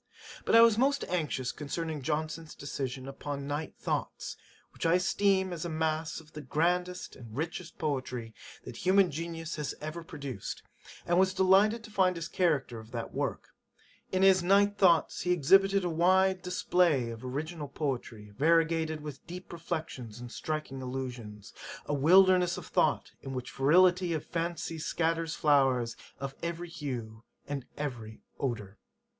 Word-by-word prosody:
"' - - -14
But - - +3
I 230 - +10
was 230 -1 +6
most 280 +2 +2
anxious 150 -7 -1
concerning 155 +1 -4
Johnson's 155 +2 -3
decision 135 -2 -5
upon 140 0 -5
Night 145 +2 -4
Thoughts, - - -3 0.4
which - - -7
I 165 +1 +4
esteem 190 0 +2
as 165 - -4
a 170 - -3
mass 160 0 -1
of 155 -2 -17
the 150 - -7
grandest 180 +6 -1
and 115 -1 -11
richest 165 +2 -4
poetry 130 -6 -3 0.3
that - - -9
human 190 0 +4
genius 165 +1 -5
has 150 -2 -3
ever 155 +3 -6
produced; 140 - -6 0.4
and 175 +1 +3
was 190 0 +3
delighted 200 +5 +4
to 225 - -11
find 185 -3 +3
this 165 - -4
character 150 -10 0
of 110 0 -12
that 115 -1 -4
work: - - -3 0.6
'In 185 0 +2
his 190 -1 +6
Night 200 +3 +4
Thoughts, 175 -5 +3
he 180 - -2
has 180 - +3
exhibited 195 +5 +5
a - - +2
very 170 - -2
wide 190 +1 +4
display 175 -8 +2
of 115 +1 -9
original 150 +4 -4
poetry, 125 -7 -4
variegated 160 +4 +2
with 150 -2 -9
deep 180 +1 -8
reflections 155 -9 -5
and 120 -1 -8
striking 155 -3 -4
allusions; 125 -5 -6 0.3
a 145 - -2
wilderness 180 +4 +5
of - - -7
thought, - - +1
in 135 -1 -6
which 125 0 -5
the - - -17
fertility 175 +5 +4
of 155 - -3
fancy 165 -1 -3
scatters 165 +1 -1
flowers 135 -5 +3 0.2
of 135 0 -4
every 170 +1 -4
hue 120 -9 -6 0.2
and 140 -1 -3
of - - -38
every 120 -7 -5 0.2
odour. 105 -7 -3
160 Hz, 165 wpm, -30 LUFS, 135-180 Hz, 0.6 s, I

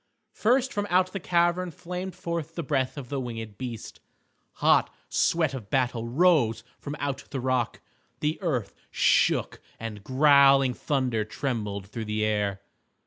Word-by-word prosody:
First 260 +4 +2
from 205 0 -1
out 185 +1 +2
the 195 - -3
cavern 175 +1 +1
flamed 180 +3 -6
forth 165 -1 -4
the 170 - -3
breath 135 -1 -1
of 130 -4 -7
the 140 - -2
winged 115 -4 -6
beast. 120 -4 -6 0.5
Hot - - +3 0.2
sweat 160 -4 +2
of 115 -7 -7
battle 125 -3 0
rose 135 -4 +3 0.2
from 145 0 -6
out 140 -2 -3
the 135 - -3
rock. 130 -2 -1 0.4
The 150 +4 -1
earth 130 - -1 0.2
shook - - +2 0.2
and 110 -3 -6
growling 135 0 +5
thunder 125 -6 0
trembled 105 -5 -3
through 110 +3 -6
the 105 0 -1
air. 105 -2 -1
135 Hz, 145 wpm, -27 LUFS, 115-170 Hz, 0.5 s, growling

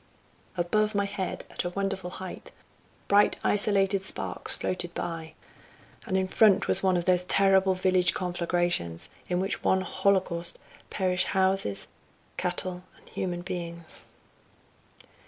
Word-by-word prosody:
Above 210 +5 +1
my 200 0 +2
head, 195 -2 -4
at - - -2
a 175 - -2
wonderful 195 -1 -3
height, 185 0 -8 0.6
bright 205 +1 +4
isolated 195 -1 +2
sparks 190 - -1
floated 175 -1 -3
by, 165 -2 -5 0.7
and 190 - +1
in 190 0 +1
front 205 0 +4
was - - +1
one 185 -2 +3
of 175 - -2
those 180 -1 +3
terrible 190 0 +4
village 185 -1 +3
conflagrations, 175 - -1 0.2
in 180 0 +1
which 190 +1 0
in - - -23
one 190 - +2
holocaust 185 -2 0 0.3
perish 185 -2 0
houses, 190 - +1 0.5
cattle 180 -1 -2 0.2
and - - -20
human 175 -1 -3
beings. 170 -2 -6
185 Hz, 130 wpm, -28 LUFS, 175-195 Hz, 0.7 s, bright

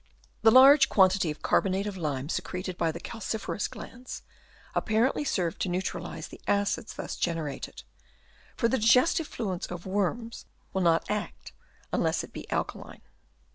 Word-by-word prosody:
The 225 - +7
large 270 +3 +8
quantity 190 -3 +4
of 150 - -6
carbonate 195 +1 +2
of 205 -2 -4
lime 145 -6 -3
secreted 180 +2 -3
by 165 -2 0
the 170 - -7
calciferous 220 0 -3
glands 250 0 -9 0.5
apparently 230 +7 +1
serves 180 - -1
to 190 - -2
neutra 180 +2 -2
lise - - -7
the - - -12
acids 205 +2 0
thus - - -5
generated; 160 - -3 0.7
for 230 - +3
the 260 +3 +1
digestive 250 +8 +4
fluid 190 -7 -4
of 175 -1 -6
worms 205 +4 -2 0.3
will 190 - 0
not 165 -2 +3
act 210 0 -4 0.4
unless - - +1
it - - -11
be - - -8
alkaline. - - -4
195 Hz, 150 wpm, -28 LUFS, 175-230 Hz, 0.7 s, large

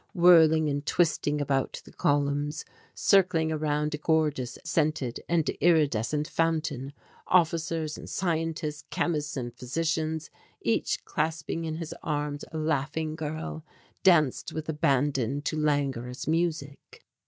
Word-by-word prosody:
Whirling 160 -3 +6
and 145 -1 -1
twisting 150 -2 +1
about 135 -2 -1
the - - -13
columns, 145 +1 0 0.3
circling 180 -5 +3
around 150 -1 0
a 150 - -3
gorgeous 150 -5 0
scented 150 -7 0
and 170 -2 +2
iridescent 150 -3 +2
fountain, 155 -5 -1 0.3
officers 165 -3 +1
and - - -9
scientists, 165 -3 -2
chemists 150 -4 -1
and 120 -2 -4
physicians, 160 +4 -2 0.3
each - - 0
clasping 160 +1 -2
in 160 -1 -3
his 165 -1 -5
arms 145 -1 -2
a 160 - -5
laughing 155 +1 -1
girl, 155 0 -5 0.4
danced 155 -8 +3
with 155 0 -5
abandon 140 -3 +1
to 155 - -2
languorous 140 -5 -1
music. 155 -3 -2
155 Hz, 120 wpm, -28 LUFS, 145-160 Hz, 0.4 s, Whirling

